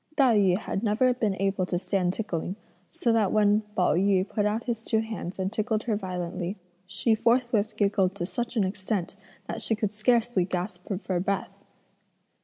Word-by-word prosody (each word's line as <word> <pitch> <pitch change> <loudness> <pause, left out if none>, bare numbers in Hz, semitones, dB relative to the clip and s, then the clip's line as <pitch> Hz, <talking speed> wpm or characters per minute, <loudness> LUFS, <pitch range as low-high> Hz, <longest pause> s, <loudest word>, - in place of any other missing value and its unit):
Tai 265 -6 +5
yü 185 -3 +4
had 195 - -3
never 230 +4 +3
been 220 -5 0
able 195 -1 +1
to 175 - 0
stand 185 0 0
tickling, 185 -4 -3 0.3
so 235 - 0
that 215 -4 +2
when 210 0 +4
Pao 180 -5 +3
yü 190 +2 +2
put 210 -2 0
out 220 +2 -1
his 230 -3 -3
two 220 -1 +1
hands 215 -5 -5
and 190 +2 -2
tickled 220 0 0
her 225 -3 0
violently, 180 -1 -4 0.3
she 210 +3 +1
forthwith 235 -1 +2
giggled 200 -2 +2
to 175 - -3
such 235 +7 -3
an 210 - +4
extent 190 -1 -2 0.3
that - - -4
she 225 - +1
could 215 -1 -2
scarcely 230 -2 +2
gasp 180 0 -4
for 190 -2 -2
breath. 195 +2 -3
205 Hz, 180 wpm, -27 LUFS, 185-225 Hz, 0.3 s, Tai